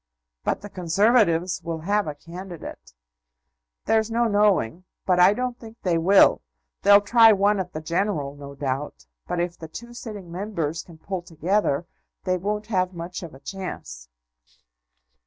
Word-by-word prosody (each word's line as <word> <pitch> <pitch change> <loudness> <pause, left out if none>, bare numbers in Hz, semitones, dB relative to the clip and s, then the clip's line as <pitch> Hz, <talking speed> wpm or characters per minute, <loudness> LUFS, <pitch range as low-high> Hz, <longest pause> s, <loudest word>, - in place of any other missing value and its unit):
"But - - -1
the 205 - -8
Conservatives 185 -1 +2
will 165 -1 -4
have 205 +3 +1
a 150 - -4
candidate." 175 - -10 0.9
"There's 220 0 +2
no 235 +1 +1
knowing; 205 - +2 0.2
but 180 -1 +3
I 185 +3 +6
don't 250 0 -3
think 225 0 -12
they 175 -3 +2
will. 190 +4 +5 0.4
They'll 200 0 +7
try 225 +2 +6
one 200 +1 +2
at 180 -1 -4
the 155 - -4
general, 165 -4 -1
no 140 -1 -10
doubt; 135 - -4 0.2
but 175 - -2
if 175 0 -2
the 160 - -7
two 235 +9 -10
sitting 210 -8 -8
Members 170 -5 -3
can 170 -2 -15
pull 185 +3 -4
together, 170 -1 0 0.4
they 185 -1 0
won't 210 +3 -2
have 185 -4 0
much 170 +2 -6
of 170 -6 -9
a - - -13
chance." 65 - -7
185 Hz, 155 wpm, -24 LUFS, 165-205 Hz, 0.9 s, They'll